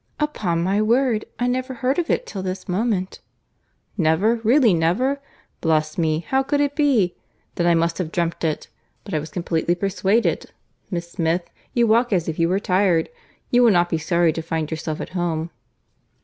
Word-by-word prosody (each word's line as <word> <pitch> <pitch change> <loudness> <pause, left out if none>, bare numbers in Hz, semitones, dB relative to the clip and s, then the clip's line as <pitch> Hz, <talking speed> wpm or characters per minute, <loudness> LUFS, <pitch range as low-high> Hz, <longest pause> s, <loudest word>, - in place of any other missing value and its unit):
"Upon 195 - -1
my 195 +4 +1
word 235 0 +2
I 245 - 0
never 255 +1 -1
heard 260 +5 0
of 340 - -2
it - - +1
till 195 - -6
this 185 0 -5
moment." 190 0 -1 0.8
"Never! 180 +8 +3
really, 230 0 +4
never!—Bless 165 - -1
me! 160 -1 0
how 265 0 +2
could 285 +2 0
it 285 0 +1
be?—Then 215 - -1
I 170 - +5
must 165 +1 0
have 165 -3 -3
dreamt 170 -1 -2
it—but 165 +5 -6
I 155 - +1
was 155 +2 -7
completely 170 0 -1
persuaded—Miss 190 -2 -2
Smith, 170 +1 -1 0.2
you 240 -1 +4
walk 230 +2 +3
as 180 -4 +1
if 160 0 -3
you 165 0 +3
were 190 +2 +1
tired. 185 -3 +2 0.4
You 245 - +5
will 240 - +6
not 175 -3 +3
be 165 - +1
sorry 170 0 +2
to 165 - -3
find 160 -1 -3
yourself 155 -1 -4
at - - -6
home." 170 -2 -2
185 Hz, 170 wpm, -22 LUFS, 165-235 Hz, 0.8 s, will